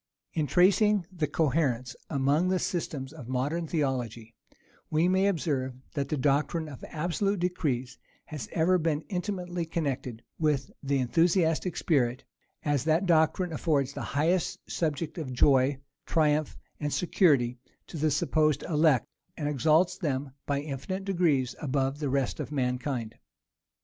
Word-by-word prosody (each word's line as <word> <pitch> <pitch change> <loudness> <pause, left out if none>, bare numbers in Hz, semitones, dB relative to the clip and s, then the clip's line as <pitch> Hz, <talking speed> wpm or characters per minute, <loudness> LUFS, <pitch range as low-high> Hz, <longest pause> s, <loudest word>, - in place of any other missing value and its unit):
[*] - - -53
In 155 -2 0
tracing 195 +3 +4
the 165 -5 -1
coherence 135 -5 0
among 145 +4 +2
the 185 0 +2
systems 150 -6 -3
of 140 -7 -10
modern 145 +7 -1
theology, 125 - -2 0.6
we 160 +3 +2
may 190 +2 +3
observe, 140 -8 -1 0.2
that 140 -3 -2
the 155 - 0
doctrine 145 +4 +1
of 140 -4 -10
absolute 180 +5 -1
decrees 145 -8 -2 0.3
has 150 -4 -7
ever 180 +2 +3
been 155 -2 0
intimately 180 -2 -3
connected 140 -8 -3 0.2
with 150 -4 +1
the 140 0 0
enthusiastic 165 +5 +2
spirit, 130 -5 +1 0.4
as 145 -4 +1
that 160 +4 +2
doctrine 170 +1 +2
affords 140 -4 0
the - - -5
highest 165 +5 0
subject 160 +1 -2
of 140 -5 -4
joy, 130 +1 +4 0.3
triumph, 155 -2 +1 0.2
and 145 -1 -2
security 140 -9 +2 0.3
to - - -11
the 155 +1 +2
supposed 150 0 +1
elect, 155 -5 +3 0.3
and 150 - -2
exalts 155 +5 +2
them 140 -4 -2 0.2
by 140 -1 0
infinite 155 +7 -5
degrees 160 -10 +1
above 135 -1 -1
the 145 -3 -1
rest 135 -1 0
of - - -4
mankind. 125 -3 -2
150 Hz, 140 wpm, -28 LUFS, 135-170 Hz, 0.6 s, tracing